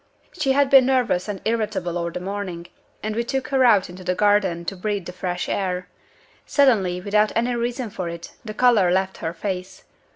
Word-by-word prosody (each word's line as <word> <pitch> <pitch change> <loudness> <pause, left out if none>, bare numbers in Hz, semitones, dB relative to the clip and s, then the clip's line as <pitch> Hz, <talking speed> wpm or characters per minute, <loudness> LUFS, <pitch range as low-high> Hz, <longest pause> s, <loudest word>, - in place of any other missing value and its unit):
"She 270 - +1
had 280 0 +2
been 265 -2 +7
nervous 245 -9 +1
and 205 -3 -5
irritable 210 -6 -1
all 170 -1 -1
the 170 - -5
morning; 185 -2 -5 0.4
and 215 0 -2
we 235 - 0
took 265 +2 -3
her 265 -2 +3
out 210 -6 +5
into 180 +1 -11
the 180 0 -1
garden 195 -4 +2
to 195 - -3
breathe 200 0 -3
the 180 - -7
fresh 180 -1 -3
air. 180 -2 -2 0.5
Suddenly, 210 -11 +2
without 210 +2 +2
any 240 +2 +1
reason 240 -1 -2
for 185 -3 -4
it, 170 0 -8
the 215 -2 -7
color 230 -7 +4
left 190 +1 0
her 165 - -3
face. 185 +1 -5
200 Hz, 195 wpm, -23 LUFS, 180-235 Hz, 0.5 s, been